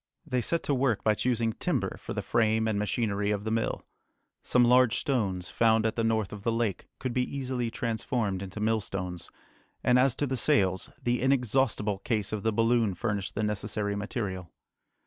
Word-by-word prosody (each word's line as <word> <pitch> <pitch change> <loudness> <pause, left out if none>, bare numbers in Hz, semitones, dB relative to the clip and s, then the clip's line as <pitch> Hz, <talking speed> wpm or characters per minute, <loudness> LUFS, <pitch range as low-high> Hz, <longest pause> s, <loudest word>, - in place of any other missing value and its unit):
They 125 -5 0
set 165 +7 +1
to 145 - 0
work 125 -5 +1
by 110 - +4
choosing 115 0 0
timber - - -1
for - - -6
the - - -2
frame 110 -1 +2
and 105 -2 0
machinery 105 -1 0
of 105 -1 -1
the 110 - -2
mill. 115 0 -1 0.6
Some 125 -1 +3
large 125 -1 +5
stones, 95 -10 -1
found 110 -1 +3
at 110 - 0
the 115 - 0
north 110 -3 0
of 105 - -7
the 115 - 0
lake, 115 -5 -1
could 130 -2 -3
be 125 - +1 0.2
easily 125 -3 -2
transformed 115 -4 -2
into 100 +2 -7
millstones; 95 -5 -2 0.5
and 125 0 +4
as 130 -1 +3
to 145 - -1
the 130 -1 -2
sails, 95 -4 +2
the 120 0 +1
inexhaustible 125 -5 +1
case 105 -1 -1
of 105 - -2
the 110 - +1
balloon 115 -2 +2
furnished 100 0 -3
the 110 - -1
necessary 105 0 -1
material. 100 -4 -4
110 Hz, 185 wpm, -28 LUFS, 100-120 Hz, 0.6 s, large